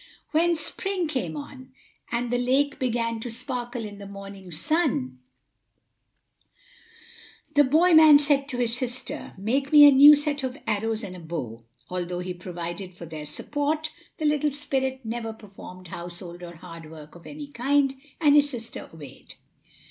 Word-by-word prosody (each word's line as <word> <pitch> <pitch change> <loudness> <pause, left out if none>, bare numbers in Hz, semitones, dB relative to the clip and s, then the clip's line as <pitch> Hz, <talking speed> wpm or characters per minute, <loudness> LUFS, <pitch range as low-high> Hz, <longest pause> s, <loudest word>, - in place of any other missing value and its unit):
When 335 +2 +3
spring 365 +3 -2
came 195 - -3
on, 260 - -10 0.4
and 240 0 -1
the 245 - +1
lake 275 +4 +1
began 230 -3 -1
to 240 - -5
sparkle 240 0 -4
in 205 -1 -9
the 200 - -9
morning 195 -1 -10
sun, 175 - -1 2.3
the 290 -1 +6
boy 320 +6 +4
man 315 -2 +9
said 285 -1 +2
to 260 -4 -4
his 240 -1 0
sister: 250 0 -5
"Make 260 +8 -1
me 295 -1 +10
a - - +8
new 285 +2 +9
set 290 0 -1
of 260 0 -4
arrows 220 +2 -1
and 185 -2 -7
a - - -9
bow." 130 -9 -6 0.2
Although 180 -1 -3
he 180 0 -4
provided 175 +1 -7
for 175 - -9
their 155 -2 -8
support, 295 - -2 0.3
the 310 - -3
little 300 0 +2
spirit 265 -2 -2
never 225 0 -4
performed 185 -4 -12
household 175 0 -8
or 175 -1 -9
hard 165 -2 -11
work 155 -1 -12
of 175 - -14
any 290 -1 -8
kind, 275 +1 +1 0.3
and 295 -3 +5
his 290 -1 +5
sister 235 -4 -7
obeyed. 150 -5 -12
240 Hz, 160 wpm, -25 LUFS, 180-285 Hz, 2.3 s, me